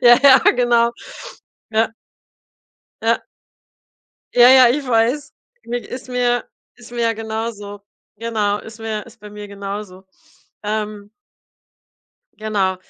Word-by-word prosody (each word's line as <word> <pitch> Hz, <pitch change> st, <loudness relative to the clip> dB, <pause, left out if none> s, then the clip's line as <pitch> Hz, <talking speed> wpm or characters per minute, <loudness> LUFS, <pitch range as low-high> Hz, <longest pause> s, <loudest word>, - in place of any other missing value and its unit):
Ja, 240 Hz, -1 st, +8 dB
ja, 270 Hz, -1 st, +9 dB, 0.2 s
genau. 240 Hz, -1 st, +3 dB, 0.8 s
Ja. 220 Hz, +1 st, +2 dB, 1.1 s
Ja. -, -, +2 dB, 1.1 s
Ja, 245 Hz, 0 st, +8 dB
ja, 260 Hz, -1 st, +8 dB
ich 275 Hz, +2 st, -1 dB
weiß. 245 Hz, +6 st, +1 dB, 0.3 s
Mir 240 Hz, +1 st, -2 dB
ist 255 Hz, 0 st, -8 dB
mir 245 Hz, -1 st, 0 dB, 0.3 s
ist 240 Hz, -1 st, -15 dB
mir 240 Hz, -1 st, -3 dB
ja 230 Hz, 0 st, +2 dB
genauso. 220 Hz, -2 st, -5 dB, 0.3 s
Genau, 210 Hz, -2 st, -1 dB
ist 220 Hz, 0 st, -12 dB
mir 220 Hz, -1 st, -4 dB
ist 235 Hz, -1 st, -17 dB
bei 210 Hz, -, -10 dB
mir 210 Hz, 0 st, -8 dB
genauso, 200 Hz, -1 st, -7 dB, 0.6 s
ähm. 210 Hz, -1 st, -4 dB, 1.3 s
Genau, 200 Hz, -4 st, 0 dB
225 Hz, 115 wpm, -19 LUFS, 210-240 Hz, 1.3 s, ja